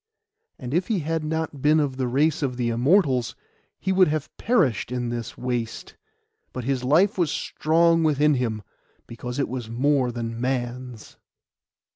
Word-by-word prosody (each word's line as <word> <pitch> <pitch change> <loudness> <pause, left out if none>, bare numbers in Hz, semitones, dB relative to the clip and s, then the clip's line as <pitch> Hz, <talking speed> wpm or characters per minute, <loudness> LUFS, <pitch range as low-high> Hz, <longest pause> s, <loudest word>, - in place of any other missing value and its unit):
And 125 +1 -6
if 175 +3 +1
he 210 -6 0
had 160 +1 -2
not 155 -2 -3
been 150 +2 +4
of 140 -3 -1
the 130 -2 -1
race 150 +6 +1
of 130 -4 -2
the 120 -2 0
Immortals, 130 - +2 0.4
he 190 - -1
would 185 -1 +5
have 150 -1 -3
perished 155 - +1
in 125 -1 -2
the 120 -1 -4
waste; 120 -3 -4 0.6
but 125 - -5
his 130 0 -1
life 175 +10 +3
was 170 -4 +2
strong 165 +3 +2
within 150 -1 +3
him, 115 -5 -2 0.4
because 125 +2 -7
it 140 - 0
was 120 -3 -5
more 130 +1 +1
than 115 -1 -5
man's. 125 -2 -4
135 Hz, 160 wpm, -24 LUFS, 120-155 Hz, 0.6 s, would